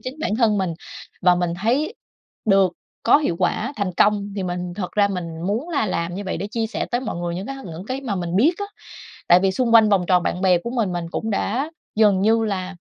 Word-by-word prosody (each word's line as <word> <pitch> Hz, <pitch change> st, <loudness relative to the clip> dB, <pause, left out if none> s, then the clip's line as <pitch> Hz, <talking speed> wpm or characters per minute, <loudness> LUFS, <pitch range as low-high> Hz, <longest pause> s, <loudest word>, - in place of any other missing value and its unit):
chính 255 Hz, +4 st, -6 dB
bản 215 Hz, -, -1 dB
thân 220 Hz, -4 st, +3 dB
mình, 180 Hz, -4 st, -1 dB, 0.5 s
và 180 Hz, 0 st, +6 dB
mình 175 Hz, -1 st, 0 dB
thấy 285 Hz, -, +1 dB, 0.5 s
được 195 Hz, -4 st, +4 dB, 0.3 s
có 240 Hz, -, +6 dB
hiệu 280 Hz, -, -1 dB
quả 280 Hz, -, 0 dB
thành 200 Hz, -3 st, -2 dB
công, 205 Hz, -1 st, +3 dB
thì 195 Hz, -, -2 dB
mình 180 Hz, -1 st, -4 dB
thật 185 Hz, -2 st, -5 dB
ra 205 Hz, -1 st, +3 dB
mình 180 Hz, -4 st, -4 dB, 0.2 s
muốn 225 Hz, -, -1 dB
là 280 Hz, -10 st, 0 dB
làm 170 Hz, -1 st, -2 dB
như 200 Hz, -, -4 dB
vậy 190 Hz, -, -3 dB
để 190 Hz, -, -4 dB
chia 225 Hz, 0 st, -1 dB
sẻ 220 Hz, -, -3 dB
tới 240 Hz, -, 0 dB
mọi 260 Hz, -, -4 dB
người 175 Hz, 0 st, -3 dB
những 185 Hz, +4 st, -5 dB
cái 275 Hz, -, -5 dB
những 170 Hz, +1 st, -8 dB
cái 260 Hz, +1 st, -3 dB
mà 245 Hz, -7 st, -3 dB
mình 175 Hz, 0 st, -2 dB
biết 295 Hz, -, +5 dB
á. 405 Hz, -, -2 dB, 0.6 s
Tại 175 Hz, +1 st, +7 dB
vì 190 Hz, 0 st, +2 dB
xung 235 Hz, +1 st, +1 dB
quanh 220 Hz, -2 st, +7 dB
vòng 195 Hz, -3 st, +3 dB
tròn 180 Hz, -2 st, +4 dB
bạn 180 Hz, -, -2 dB
bè 185 Hz, -2 st, +4 dB
của 235 Hz, +7 st, -6 dB
mình, 230 Hz, -7 st, 0 dB
mình 175 Hz, -1 st, -3 dB
cũng 220 Hz, +5 st, -3 dB
đã 245 Hz, +8 st, -1 dB, 0.2 s
dần 210 Hz, -3 st, +4 dB
như 225 Hz, +2 st, +3 dB
là 190 Hz, -3 st, -3 dB
200 Hz, 245 wpm, -22 LUFS, 180-230 Hz, 0.6 s, Tại